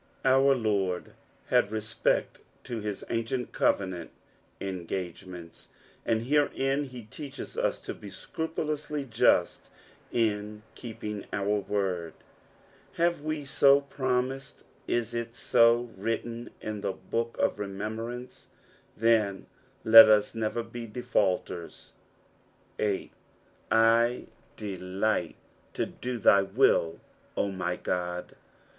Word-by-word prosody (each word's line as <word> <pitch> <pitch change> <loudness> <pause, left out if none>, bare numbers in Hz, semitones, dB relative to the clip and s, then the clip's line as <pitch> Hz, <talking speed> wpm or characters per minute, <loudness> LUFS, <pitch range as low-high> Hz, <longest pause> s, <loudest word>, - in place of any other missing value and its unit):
Our 135 +1 +5
Lord 100 -6 -1 0.4
hail - - +5
respect 110 +1 -1 0.2
to 120 -2 -4
his 105 -2 -4
ancieut 115 +2 -2
covenant 95 -4 0 0.5
engagements, 90 -2 -6 0.4
and 115 0 +1
herein 140 0 +1
he 125 -3 -9
teaches 135 +6 -8
us - - 0
to - - -5
be 100 - -10
scrupuloiuly 150 +4 -4
just 115 - +2 0.4
in 105 -2 -1
keeping 105 -3 -6
our 105 +1 0
word; 95 -5 -2 0.8
hiive 170 -2 +2
we 155 -1 -3
so 140 +1 +5
ptomised, 130 0 -1 0.2
is 120 -1 -1
it 115 0 -4
so 115 +1 +4
written 115 +3 -3
in 105 -1 -4
tho 95 - -1
book 115 +4 -3
of - - +1
remembmnue 110 +5 -4
t - - -22 0.5
then 110 -3 +2 0.4
let 110 0 +11
us 105 -1 +4
never 115 +1 -1
be 115 0 -7
defaulters. 100 -7 -2 0.9
8. 105 -2 -1 0.3
'' - - -34
Ideliffht 110 -4 +1 0.4
to - - 0
do 125 0 -5
thy 100 -3 +6
uiU, 85 -3 +2 0.4
0 - - +2
my 90 -2 -2
God." 90 0 -3
110 Hz, 110 wpm, -28 LUFS, 100-120 Hz, 0.9 s, let